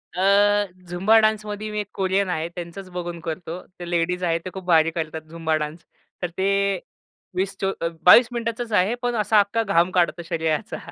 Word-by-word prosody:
अ, 205 +2 +4 0.2
Zumba 195 +6 +4
डान्समध्ये 215 -1 0
मी 210 - -2
एक 205 - -3
Korean 190 0 0
आहे 160 -2 -1
त्यांचंच 180 +2 -7
बघून 175 -1 -5
करतो. 165 +2 -5 0.2
त्या 175 -1 -7
लेडीज 175 +1 0
आहे 165 -1 +2
त्या 185 +2 -8
खूप 190 -2 -8
भारी 165 -2 +4
करतात 160 -1 -4
झुंबा 165 -1 -1
डान्स 150 +2 -4 0.4
तर 180 - 0
ते 195 0 +1 0.6
20 190 +1 -1
चोवी 190 -3 -1 0.2
22 235 +6 +9
मिनिटाचाच 230 0 -3
आहे. 205 +5 +3
पण 245 -1 -1
असा 210 0 +3
अख्खा 205 +3 +1
घाम 185 -3 +2
काढतो 175 -1 +1
शरीराचा. 160 -2 -1
185 Hz, 175 wpm, -23 LUFS, 170-205 Hz, 0.6 s, 22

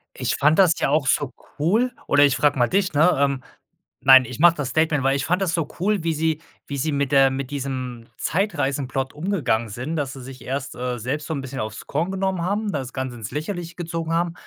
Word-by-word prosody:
Ich - - -1
fand 150 +3 +3
das 180 -4 +6
ja - - +1
auch 145 -2 +2
so 130 -1 +1 0.3
cool 220 +11 +2 0.2
oder 145 0 +5
ich 140 - +2
frage 145 -2 +2
mal 120 - +3
dich, 185 0 +1
ne? 165 +5 +5
Ähm, 140 -2 +1 0.6
nein, 130 -1 +8
ich 120 0 -8
mache 170 +1 +6
das 140 -3 -3
Statement, 155 -3 +1
weil 135 0 +3
ich 140 - -1
fand 180 +3 +1
das 180 -3 0
so 165 -4 0
cool, 200 0 +1
wie 165 -1 +1
sie 160 0 0 0.3
wie 140 - -4
sie 155 +4 -1
mit 140 -1 -1
der 135 -1 +6
mit 135 0 -4
diesem 130 -4 -4
Zeitreisen-Plot 140 -8 -1
umgegangen 145 - -1
sind, 130 +10 -4
dass 140 -3 -2
sie 135 - -9
sich 130 0 -10
erst, 135 +1 -4
äh, 125 -1 -3
selbst 140 +6 -3
so 160 - -2
'n 140 - -3
bisschen 130 0 -6
aufs 110 0 -5
Korn 165 +6 -1
genommen 190 -2 -1
haben, 205 +3 -1
das 130 -5 -4
Ganze 130 -2 -4
ins 110 -1 -7
Lächerliche 170 +3 -4
gezogen 165 -1 -3
haben, 170 0 0
145 Hz, 230 wpm, -23 LUFS, 130-170 Hz, 0.6 s, nein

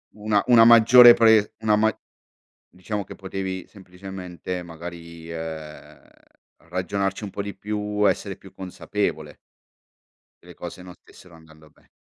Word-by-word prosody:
Una 105 -1 0
una 120 -2 +7
maggiore 120 +1 +8
pre 110 -2 +4
una 110 -1 +2
ma 110 0 +1 0.8
diciamo 100 +3 -5
che - - -12
potevi 95 -1 -6
semplicemente, 90 -2 -8
magari, 85 0 -10
ehm, 80 -2 -9 0.7
ragionarci 95 +2 -3
un 100 - -7
po' 100 - -5
di 100 0 -7
più. 105 0 -2
Essere - - -2
più - - -16
consapevole. 95 -1 -4 1.1
che - - -21
le - - -13
cose 90 - -9
non 90 -1 -11
stessero 90 - -19
andando 80 -1 -18
be - - -29
95 Hz, 135 wpm, -23 LUFS, 85-105 Hz, 1.1 s, maggiore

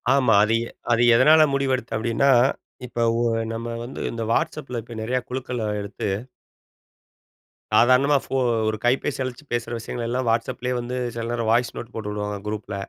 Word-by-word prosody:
ஆமா. 125 -5 +3
அது 110 +1 +1
எ - - -7 0.2
அது 115 +1 +3
எதனால 155 +6 +6
முடிவெடுத்தென் 130 -4 -1
அப்டின்னா, 115 +4 +2 0.6
இப்போ 120 -1 -2 0.2
உ - - +1 0.3
நம்ம 115 +1 -5 0.2
வந்து 125 - -8
இந்த 115 -1 -4
WhatsAppல 125 -6 -2 0.2
நிறய 125 +3 0
குழுக்கள 125 -2 -4 0.2
எடுத்து 100 0 -4 1.6
சாதாரணமா 130 +5 +5
ஃபோ - - -4 0.3
ஒரு 110 0 -1
கைபேசி 130 +3 +1
அழச்சு 130 +3 -6
பேசுற 120 0 -2
விஷயங்கள் 115 +1 -5
எல்லாம் 125 0 -1
WhatsAppலயே 125 +2 -1
வந்து 125 +1 -4 0.2
சில 115 0 -3
நேரம் 115 -2 -1
வாய்ஸ் 120 +1 +2
நோட் 120 +1 -8
போட்டு 105 -2 -4
உடுவாங்க 105 0 -3
குரூப்ல. 105 -1 -4
120 Hz, 155 wpm, -23 LUFS, 115-130 Hz, 1.6 s, எதனால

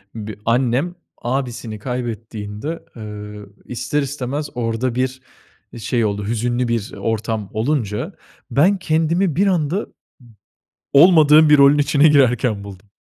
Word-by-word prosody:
bi 110 -1 -7
annem 125 +8 +1 0.3
abisini 120 -4 -3
kaybettiğinde, 115 +3 -5
eee, 105 -2 -8 0.3
ister 135 +4 -2
istemez 140 +1 -4
orada 115 +1 -2
bir 130 +1 -2 0.6
şey 115 0 -1
oldu 100 -1 -2
hüzünlü 120 +2 -1
bir 115 -3 -2
ortam 110 -2 -3
olunca. 110 -3 -2 0.4
Ben 180 +9 +3
kendimi 165 0 0
bir 195 +5 +2
anda 180 +1 0
b - - -28 1.0
olmadığım 155 0 +7
bir 150 -1 +6
rolün 140 +1 +6
içine 145 +1 +4
girerken 125 -7 +2
buldum. 100 0 -11
125 Hz, 120 wpm, -19 LUFS, 110-150 Hz, 1.0 s, olmadığım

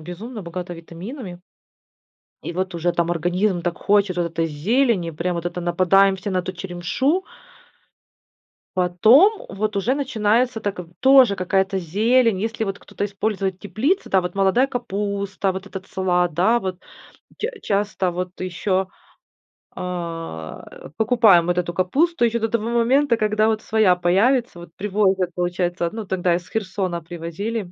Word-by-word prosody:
Безумно 205 +7 -8
богата 175 +1 -6
витаминами. 175 - -9 1.0
И - - -5
вот 185 +1 -3
уже 175 +1 0
там 170 0 0
организм 175 +2 0
так 175 0 -2
хочет 200 -2 +2
вот 175 -1 0
этой 165 0 -1
зелени, 190 - +1
прям, 170 +3 -2
вот 170 0 -3
это 175 0 -4
нападаем 185 +3 +3
все 190 +1 -5
на 185 - 0
эту 185 +1 -3
черемшу. 190 - -1 1.5
Потом 225 - +4
вот 210 +2 -3
уже 235 +7 +1
начинается 235 -3 +1
так, 205 -2 -3
в 175 -1 -8
тоже 265 -5 +6
какая-то 190 +1 0
зелень. 220 +5 +2
Если 225 +1 -2
вот 195 -1 -4
кто-то - - -5
использует 195 -2 -2
теплицу, 220 - -1
да, 190 - +4
вот, 180 +1 -5
молодая 195 +7 +3
капуста, 200 -5 -2
вот 190 +1 -7
этот 190 -1 -8
салат, 180 -2 0
да, 220 +8 +3
вот. 185 -3 -4 0.6
Ча 445 - -1
часто 200 -2 0
вот 180 +1 -5
ещё, 185 +1 -1 0.9
а, 165 - -5
э, - - -12
покупаем 220 -7 +5
вот 175 0 0
эту 175 -1 -1
капусту 270 - +1
ещё 235 0 0
до 225 - 0
того 230 0 -1
момента, 240 +2 +3
когда 215 0 +2
вот 220 -1 0
своя 215 -5 +3
появится. 200 +5 +2
Вот 170 - -11
привозят, 195 -2 +1
получается. 175 -1 -1
Ну, 220 -1 -6
тогда 180 -2 +1
из 175 0 -6
Херсона 190 -4 -2
привозили. 175 +5 -5
190 Hz, 150 wpm, -22 LUFS, 175-220 Hz, 1.5 s, тоже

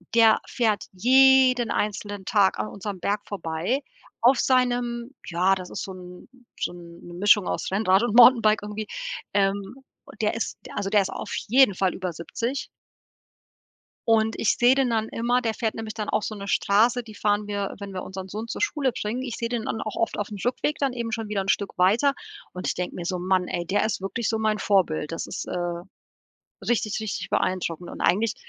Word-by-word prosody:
der 225 -1 +6
fährt 220 -4 0
jeden 255 +2 +5
einzelnen 205 -1 -3
Tag 200 - +3
an 105 - -1
unserem 200 - -6
Berg 205 +3 -1
vorbei 190 - -2 0.4
auf 245 +2 +5
seinem 245 -1 +1
ja, 185 +2 +2
das 185 -1 -7
ist - - -4
so 190 - -6
'n 180 -1 -12 0.3
so - - -2
'n 170 -1 -12
'ne 175 - -10
Mischung 205 +1 +4
aus - - -2
Rennrad 195 +1 +3
und 235 -2 0
Mountainbike 230 -4 +7
irgendwie. 210 0 -5 0.5
Ähm, 200 +2 0 0.5
der 210 - +1
ist, 230 - -3
d - - -10
also, 195 - -2
der 205 -1 +4
ist 190 - -5
auf - - -6
jeden 250 -4 +5
Fall 190 -1 +1
über 185 -2 -3
70. 235 - -4 1.4
Und 220 -1 +3
ich 215 - +2
sehe 245 +2 +5
den 265 -3 +2
dann 220 -1 0
immer, 245 +2 0
der 225 -2 -1
fährt 220 -1 -2
nämlich 220 -1 -5
dann 215 -2 -4
auch 215 0 0
so 215 - -4
'ne 200 0 -7
Straße, 230 +5 +3
die 215 -2 -12
fahren 205 0 0
wir, 200 -1 -3
wenn 200 -1 -7
wir 185 - -4
unseren 190 0 -7
Sohn 215 +4 -6
zur - - -5
Schule 290 -10 +1
bringen. 225 +4 -3
Ich 250 -4 -4
sehe 230 0 -3
den 235 -2 -2
dann 220 - -3
auch 215 - -5
oft 230 - -1
auf'm 205 -1 -5
Rückweg 255 +4 -1
dann 275 -3 0
eben 235 -2 -4
schon 225 -2 -3
wieder 200 -2 0
'n 195 - -4
Stück 200 -2 0
weiter 225 +10 +4 0.4
und 180 - -5
ich - - +1
denke 180 0 -4
mir 175 - -5
so: 180 0 -2
„Man 185 0 +1
ey, 175 0 -3
der 205 +4 +1
ist 220 - -2
wirklich 210 +3 -2
so 220 -1 0
mein 215 -1 +1
Vorbild. 170 -7 +1
Das 165 - -4
ist, - - -5
äh, 175 -1 -3 0.8
richtig, 220 -3 0
richtig 215 -2 -4
beeindruckend.“ 175 -2 -1
Und - - -9
eigentlich 210 +4 +2
210 Hz, 205 wpm, -25 LUFS, 190-235 Hz, 1.4 s, Mountainbike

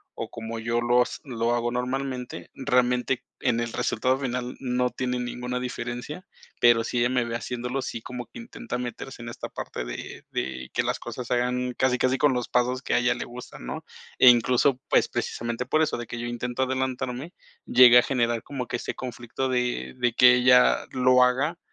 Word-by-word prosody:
o - - -5
como 115 0 -6
yo 115 +1 0
lo 120 +1 +4
s - - -7
lo 120 -3 -1
hago 120 0 -1
normalmente. 125 0 -4
Realmente, 125 -1 +1 0.2
en 120 -2 +1
el 120 -1 -3
resultado 130 +4 +1
final 125 -2 -3
no 125 -1 0
tiene 125 -1 -2
ninguna 125 0 -3
diferencia, 125 +6 -5 0.4
pero 120 -1 +6
si 120 - -2
ella 120 +1 +3
me 125 -2 +1
ve 115 0 -4
haciéndolo 125 +2 -3
sí 115 - -5
como 125 -1 -7
que - - -13
intenta 235 - -6
meterse 125 0 -6
en 115 - -6
esta 115 - -7
parte - - -6
de - - -7
de 65 -1 -4
que - - +1
las - - -1
cosas 125 - -6
se - - 0
hagan 125 +1 0
casi 130 -1 +2
casi 130 +1 +1
con 145 -2 +4
los 125 -1 -2
pasos 125 +1 0
que - - -1
a - - +4
ella 125 0 +2
le - - -5
gustan, 120 - -10
¿no?, 65 - -5 0.4
e 130 - +9
incluso, 125 +2 +4
pues, - - +3
precisamente 115 +1 -3
por 155 +5 +2
eso 155 0 +1
de 120 - -5
que 120 +3 -6
yo 120 - -3
intento 120 +1 -3
adelantarme, 130 +3 -3 0.3
llega 125 -1 +8
a - - +2
generar 120 -4 0
como 130 -4 -5
que 120 - -2
este - - -4
conflicto 125 +1 -4
de 125 0 -1
de 120 -2 +1
que 125 +1 +7
ella 125 0 +5
lo 125 0 +5
haga, 135 +7 +1
125 Hz, 200 wpm, -26 LUFS, 120-130 Hz, 0.4 s, e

